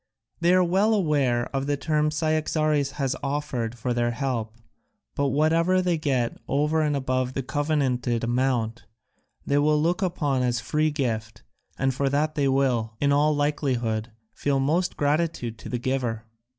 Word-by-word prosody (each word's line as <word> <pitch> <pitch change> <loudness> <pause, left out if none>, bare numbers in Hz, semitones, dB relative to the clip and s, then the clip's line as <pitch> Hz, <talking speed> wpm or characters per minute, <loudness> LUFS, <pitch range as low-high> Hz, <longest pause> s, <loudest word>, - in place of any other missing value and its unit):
They 170 +1 +3
are 185 - +5
well 195 +5 +2
aware 140 - +1
of 135 +1 -1
the 145 0 0
terms 150 +1 0
Cyaxares 155 -2 +1
has 135 -3 -1
offered 135 -5 -3
for 120 +2 -2
their 120 0 +1
help: 120 -3 -3 0.6
but 140 - 0
whatever 165 +6 +2
they 180 -3 +1
get 130 -6 -1
over 150 +3 +1
and 150 -1 +1
above 130 -1 -1
the 135 - -2
covenanted 130 -5 0
amount 120 -1 0 0.6
they 140 +1 +2
will 150 +1 +3
look 175 +5 +1
upon 150 -8 0
as 120 -1 0
a - - -10
free 155 +1 +1
gift, 110 -7 -3 0.3
and 135 0 +1
for 135 +2 0
that 150 +2 0
they 145 -3 +1
will, 125 -5 +1
in 140 0 +2
all 150 +1 +3
likelihood, 125 -6 -1 0.2
feel 140 -1 0
most 160 +7 0
gratitude 145 -6 -1
to - - -9
the 125 - -1
giver." 120 -3 -2
140 Hz, 165 wpm, -25 LUFS, 125-155 Hz, 0.6 s, are